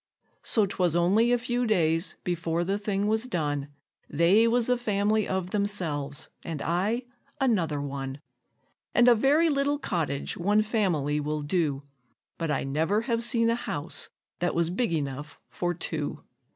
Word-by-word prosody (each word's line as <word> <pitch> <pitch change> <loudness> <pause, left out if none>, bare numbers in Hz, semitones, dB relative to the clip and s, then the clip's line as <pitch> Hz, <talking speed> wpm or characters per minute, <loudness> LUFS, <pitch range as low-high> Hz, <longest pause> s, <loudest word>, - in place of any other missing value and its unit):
So 215 -3 +2
'twas 180 -4 0
only 200 +8 +3
a 245 - +4
few 245 0 -1
days 165 -4 +1
before 170 -1 -1
the 195 +3 -1
thing 205 -1 -1
was 220 +3 +1
done 145 - -1 0.4
They 185 +9 +4
was 235 0 +2
a 250 - +3
family 215 -2 +1
of 190 -1 -2
themselves, 160 -9 -2 0.2
and 160 -3 -4
I 200 +9 0 0.4
another 185 - +1
one; 135 -1 -5 0.8
And 240 0 +6
a 245 - +9
very 280 +8 +3
little 285 0 +1
cottage 165 - -2
one 205 +4 +2
family 175 - 0
will 150 0 -2
do, 145 -3 0 0.6
But 165 -1 -2
I 150 - 0
never 160 +10 +1
have 230 -1 0
seen 230 -1 +4
a - - +2
house 150 -9 -4 0.3
that 175 0 0
was 170 0 +1
big 230 +2 0
enough 145 -2 -4
for 175 0 -1
two. 155 -3 -4
180 Hz, 155 wpm, -27 LUFS, 155-225 Hz, 0.8 s, a